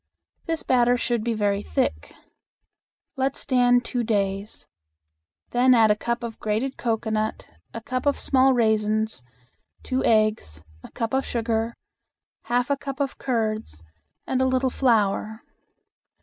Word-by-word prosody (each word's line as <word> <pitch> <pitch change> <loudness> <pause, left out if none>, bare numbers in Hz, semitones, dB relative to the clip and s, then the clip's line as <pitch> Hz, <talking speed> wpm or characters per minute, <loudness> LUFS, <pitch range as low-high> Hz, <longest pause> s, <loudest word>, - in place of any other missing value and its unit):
This 325 -1 -2
batter 245 -1 +3
should 240 -2 -1
be 235 0 -1
very 205 -1 0
thick. 260 +4 -2 1.1
Let 270 +1 0
stand 245 -2 +2
two 245 -1 -2
days. 200 -2 -2 0.9
Then 250 +1 +4
add 220 -2 +5
a - - +3
cup 235 +2 -3
of 230 -2 -6
grated 220 +6 -1
cocoanut, 220 -2 -2 0.2
a 230 - -7
cup 255 +4 -3
of 285 - +2
small 265 0 +3
raisins, 220 - +1 0.6
two 260 0 -1
eggs, 215 - +1 0.2
a - - -10
cup 230 0 -4
of 265 0 +2
sugar, 230 -1 -2 0.7
half 245 +3 0
a 280 - +2
cup 275 0 -6
of 275 -1 -2
curds, 215 - -2 0.4
and 260 0 0
a - - +3
little 260 0 +1
flour. 220 -3 +1
235 Hz, 135 wpm, -24 LUFS, 215-255 Hz, 1.1 s, add